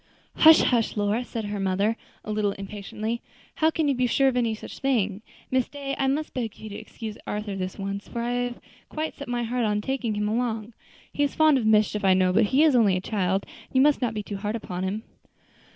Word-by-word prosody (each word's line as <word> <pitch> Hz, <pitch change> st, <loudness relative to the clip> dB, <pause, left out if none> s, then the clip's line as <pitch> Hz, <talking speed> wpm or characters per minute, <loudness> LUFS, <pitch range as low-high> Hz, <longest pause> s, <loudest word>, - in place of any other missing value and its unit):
"Hush, 320 Hz, 0 st, +8 dB
hush, 230 Hz, -3 st, +1 dB
Lora," 205 Hz, +4 st, +1 dB
said 225 Hz, -3 st, -5 dB
her 205 Hz, 0 st, -3 dB
mother, 195 Hz, +3 st, +1 dB, 0.3 s
a 215 Hz, -, -4 dB
little 210 Hz, -1 st, 0 dB
impatiently; 210 Hz, +3 st, -5 dB, 0.4 s
"how 315 Hz, -, +4 dB
can 320 Hz, -1 st, 0 dB
you 280 Hz, -, +3 dB
be 250 Hz, -1 st, +1 dB
sure 270 Hz, +3 st, +3 dB
of 260 Hz, -, +2 dB
any 230 Hz, -3 st, +1 dB
such -, -, -10 dB
thing; 215 Hz, -7 st, 0 dB, 0.3 s
Miss 260 Hz, -1 st, +1 dB
Day, 280 Hz, -1 st, -5 dB
I 270 Hz, -, 0 dB
must 295 Hz, +3 st, -1 dB
beg 230 Hz, -4 st, -3 dB
of -, -, -23 dB
you 215 Hz, -, -8 dB
to 205 Hz, -, -8 dB
excuse 220 Hz, -1 st, -8 dB
Arthur 210 Hz, -1 st, -3 dB
this 185 Hz, -1 st, -4 dB
once, 200 Hz, 0 st, -4 dB
for 235 Hz, -1 st, -4 dB
I 240 Hz, -, -1 dB
have 245 Hz, 0 st, -6 dB, 0.3 s
quite 315 Hz, +1 st, -3 dB
set 285 Hz, -, -9 dB
my 245 Hz, 0 st, -1 dB
heart 240 Hz, +1 st, -1 dB
on 210 Hz, -1 st, +1 dB
taking 240 Hz, -1 st, -2 dB
him 210 Hz, 0 st, 0 dB
along. 225 Hz, 0 st, -2 dB, 0.4 s
He -, -, -2 dB
is 285 Hz, -1 st, +1 dB
fond 310 Hz, -3 st, +5 dB
of 220 Hz, -, -1 dB
mischief, 210 Hz, -1 st, +3 dB
I 190 Hz, -1 st, +5 dB
know, 185 Hz, -1 st, +3 dB
but 215 Hz, +3 st, +4 dB
he 270 Hz, +8 st, +3 dB
is 305 Hz, -4 st, +5 dB
only 205 Hz, -6 st, +4 dB
a -, -, -1 dB
child, 190 Hz, -1 st, 0 dB, 0.2 s
and -, -, -25 dB
you 260 Hz, -, +6 dB
must 290 Hz, 0 st, +4 dB
not 235 Hz, -3 st, 0 dB
be 210 Hz, -, -3 dB
too 200 Hz, 0 st, -5 dB
hard 210 Hz, +2 st, -3 dB
upon 180 Hz, -5 st, -5 dB
him." 195 Hz, +4 st, -2 dB
220 Hz, 240 wpm, -26 LUFS, 205-255 Hz, 0.4 s, Hush